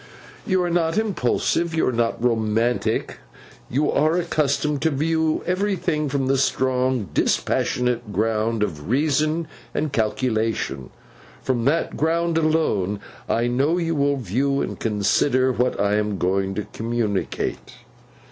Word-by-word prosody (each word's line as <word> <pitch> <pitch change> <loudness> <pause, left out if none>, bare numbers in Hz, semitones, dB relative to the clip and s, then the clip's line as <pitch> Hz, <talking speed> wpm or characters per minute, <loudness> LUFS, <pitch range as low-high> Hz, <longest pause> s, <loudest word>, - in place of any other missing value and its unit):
You 185 -3 +2
are 175 - -1
not 165 +1 +1
impulsive, 170 - 0
you 160 - +2
are - - +1
not 115 -1 -1
romantic, 115 0 0 0.5
you 145 +4 +1
are 155 +3 +2
accustomed 150 -4 0
to 160 - +3
view 160 +2 0
everything 180 -5 0
from 135 -1 0
the 135 0 +2
strong 130 - +1
dispassionate 120 +4 0
ground 110 +2 0
of 75 -4 -4
reason 155 +4 +1 0.3
and 150 -2 -1
calculation. 110 - -1 0.5
From 120 -3 0
that 160 +5 +1
ground 165 +1 +1
alone, 130 - +1 0.3
I 115 - +1
know 135 +8 +1
you 165 -2 0
will 140 -1 +1
view 135 +5 0
and - - -4
consider 120 +5 +2
what 125 0 0
I 100 +1 +2
am 105 -2 -1
going 95 +2 0
to 105 - -3
communicate. 110 -3 -2
130 Hz, 130 wpm, -23 LUFS, 110-155 Hz, 0.5 s, to